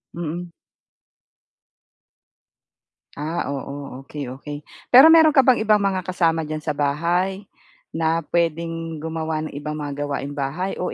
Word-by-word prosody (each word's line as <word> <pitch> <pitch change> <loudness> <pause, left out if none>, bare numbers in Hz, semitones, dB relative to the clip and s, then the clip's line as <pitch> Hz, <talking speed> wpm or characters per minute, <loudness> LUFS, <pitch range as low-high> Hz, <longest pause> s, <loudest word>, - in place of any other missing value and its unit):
Mm. 170 +1 -5 2.7
Ah, 155 +4 -2
oo. 140 -1 -6
Okey, 140 -3 -6
okey. 145 +3 -8 0.3
Pero 275 +6 +10
meron 320 -2 +7
ka 275 - +7
bang 255 -1 +4
ibang 215 -1 +3
mga 190 -2 0
kasama 165 -3 +1
diyan 155 0 -4
sa 150 -1 -3
bahay 170 +7 0 0.5
na 165 +1 0
puwedeng 165 -1 -2
gumawa 160 -1 -3
ng - - -13
ibang 150 +1 -4
mga 145 -1 -4
gawaing 140 0 -4
bahay 155 +8 -3
o 180 - -3
160 Hz, 130 wpm, -22 LUFS, 145-180 Hz, 2.7 s, Pero